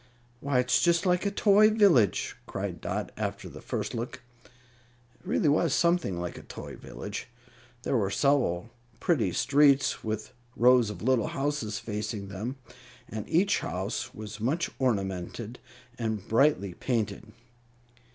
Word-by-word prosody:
"Why, 140 Hz, 0 st, 0 dB
it's 130 Hz, +1 st, +3 dB
just 170 Hz, +2 st, +3 dB
like 180 Hz, +2 st, +2 dB
a -, -, +2 dB
toy 205 Hz, +1 st, +5 dB
village!" 195 Hz, -, +3 dB
cried -, -, -4 dB
Dot, -, -, -3 dB
after -, -, -3 dB
the -, -, -10 dB
first -, -, -3 dB
look. 120 Hz, +2 st, -5 dB, 0.2 s
It 120 Hz, 0 st, -29 dB
really 210 Hz, -, +1 dB
was 150 Hz, +1 st, +3 dB
something 170 Hz, -, +1 dB
like 90 Hz, -1 st, -5 dB
a -, -, -10 dB
toy -, -, -9 dB
village. 100 Hz, 0 st, -7 dB, 0.6 s
There -, -, 0 dB
were 100 Hz, -5 st, +1 dB
several 120 Hz, -5 st, +1 dB, 0.3 s
pretty 125 Hz, -, +1 dB
streets, 140 Hz, +5 st, +3 dB
with 110 Hz, +3 st, -4 dB, 0.2 s
rows 125 Hz, -1 st, +5 dB
of 105 Hz, -, -7 dB
little 125 Hz, -2 st, +2 dB
houses 135 Hz, -7 st, -2 dB
facing 105 Hz, -2 st, -4 dB
them, 105 Hz, +7 st, -4 dB, 0.5 s
and 110 Hz, -1 st, -6 dB
each 195 Hz, +5 st, +3 dB
house 95 Hz, +4 st, -3 dB
was 105 Hz, 0 st, -8 dB
much 145 Hz, +10 st, 0 dB
ornamented 105 Hz, -1 st, -2 dB, 0.4 s
and 110 Hz, -4 st, -2 dB
brightly 115 Hz, -6 st, +3 dB
painted. 110 Hz, -1 st, -2 dB
120 Hz, 140 wpm, -28 LUFS, 105-145 Hz, 0.6 s, toy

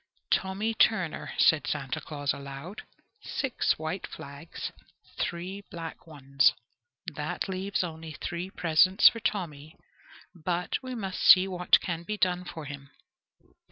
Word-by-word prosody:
"Tommy 195 Hz, +4 st, +1 dB
Turner," 190 Hz, -7 st, +1 dB
said 160 Hz, -2 st, +4 dB
Santa 135 Hz, -4 st, -2 dB
Claus 145 Hz, -2 st, -2 dB
aloud, 140 Hz, +7 st, -8 dB, 0.4 s
"six 265 Hz, -10 st, 0 dB
white 160 Hz, +4 st, -4 dB
flags, 140 Hz, +4 st, -8 dB, 0.5 s
three 185 Hz, +3 st, -3 dB
black 165 Hz, -1 st, -8 dB
ones. 140 Hz, -2 st, +3 dB, 0.6 s
That 150 Hz, +5 st, -3 dB
leaves 190 Hz, +1 st, -1 dB
only 160 Hz, -2 st, -6 dB
three 175 Hz, +4 st, -4 dB
presents 180 Hz, +3 st, +5 dB
for 230 Hz, -, -7 dB
Tommy: 160 Hz, -8 st, -3 dB, 0.6 s
but 175 Hz, 0 st, -2 dB
we 255 Hz, -1 st, -6 dB
must 195 Hz, -5 st, -4 dB
see 185 Hz, +1 st, +8 dB
what 180 Hz, -1 st, +4 dB
can 170 Hz, -2 st, -3 dB
be 210 Hz, +5 st, -4 dB
done 180 Hz, -2 st, +1 dB
for 160 Hz, -3 st, -7 dB
him." 140 Hz, -1 st, -8 dB
170 Hz, 125 wpm, -28 LUFS, 150-190 Hz, 0.6 s, see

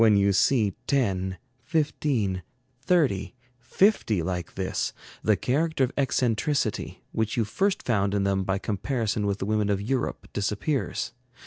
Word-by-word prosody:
When 110 Hz, -3 st, +6 dB
you 100 Hz, 0 st, +4 dB
see 105 Hz, -1 st, +3 dB
ten, 95 Hz, -9 st, +1 dB, 0.2 s
fifteen, 125 Hz, -, 0 dB, 0.4 s
thirty, 135 Hz, -, +1 dB, 0.2 s
fifty 120 Hz, -, +2 dB
like 90 Hz, -1 st, -3 dB
this, 95 Hz, -1 st, -2 dB, 0.3 s
the 110 Hz, -, +3 dB
character 150 Hz, +2 st, +1 dB
of 130 Hz, -, +1 dB
eccentricity, 130 Hz, -2 st, 0 dB
which 110 Hz, +3 st, -1 dB
you 115 Hz, -, +2 dB
first 195 Hz, -, 0 dB
found 100 Hz, -4 st, +1 dB
in 100 Hz, -, +1 dB
them 95 Hz, -1 st, +1 dB
by 95 Hz, +1 st, 0 dB
comparison 105 Hz, +1 st, -1 dB
with 100 Hz, -1 st, 0 dB
the 95 Hz, -, -3 dB
women 105 Hz, 0 st, +1 dB
of 100 Hz, -1 st, +1 dB
Europe, 120 Hz, +5 st, -2 dB
disappears. 105 Hz, +6 st, -1 dB
110 Hz, 140 wpm, -26 LUFS, 100-135 Hz, 0.4 s, When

